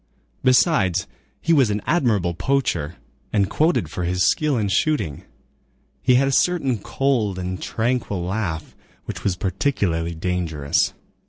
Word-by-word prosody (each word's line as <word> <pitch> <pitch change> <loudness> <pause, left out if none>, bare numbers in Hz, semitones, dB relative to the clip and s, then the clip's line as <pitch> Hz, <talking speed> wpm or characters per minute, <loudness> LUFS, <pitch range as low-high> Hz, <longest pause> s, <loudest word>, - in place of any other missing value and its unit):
Besides, 115 - +3 0.4
he 165 - +2
was 135 -7 +4
an 105 0 0
admirable 110 - +1
poacher, 90 - -1 0.4
and 100 -3 +2
quoted 155 - +1
for 90 - -3
his 90 +1 +1
skill 150 -4 +2
in 105 -3 0
shooting. 100 - 0 0.8
He 125 - +4
had 135 +2 +3
a - - +1
certain 135 -7 +2
cold 115 -5 0
and 90 0 -4
tranquil 110 -5 -1
laugh, 90 -4 -3 0.3
which - - -6
was 95 -3 +1
particularly 90 - -1
dangerous. 80 -4 0
100 Hz, 135 wpm, -22 LUFS, 90-135 Hz, 0.8 s, was